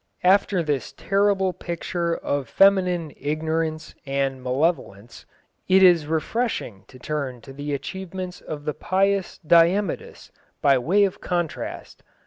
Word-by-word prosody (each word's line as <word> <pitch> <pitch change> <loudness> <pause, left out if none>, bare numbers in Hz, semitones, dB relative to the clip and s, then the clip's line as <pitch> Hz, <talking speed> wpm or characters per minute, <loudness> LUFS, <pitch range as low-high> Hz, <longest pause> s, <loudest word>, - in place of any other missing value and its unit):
After 190 -1 +3
this 145 -4 -2
terrible 195 -1 +1
picture 170 -1 -3
of 140 -3 -3
feminine 180 -5 +3
ignorance 155 +2 -2
and 135 -1 -2
malevolence, 125 - -2 0.4
it 190 +1 +5
is 170 -5 +5
refreshing 160 - -2
to 130 - -15
turn 135 -2 -4
to 135 - -12
the 145 +1 -3
achievements 185 +4 -6
of 145 -1 -7
the 150 - -1
pious 195 +2 0
Diemudis, 170 +4 +2 0.3
by 135 -2 +4
way 185 +11 +3
of 195 - -1
contrast. 175 -3 -4
165 Hz, 120 wpm, -23 LUFS, 145-185 Hz, 0.4 s, it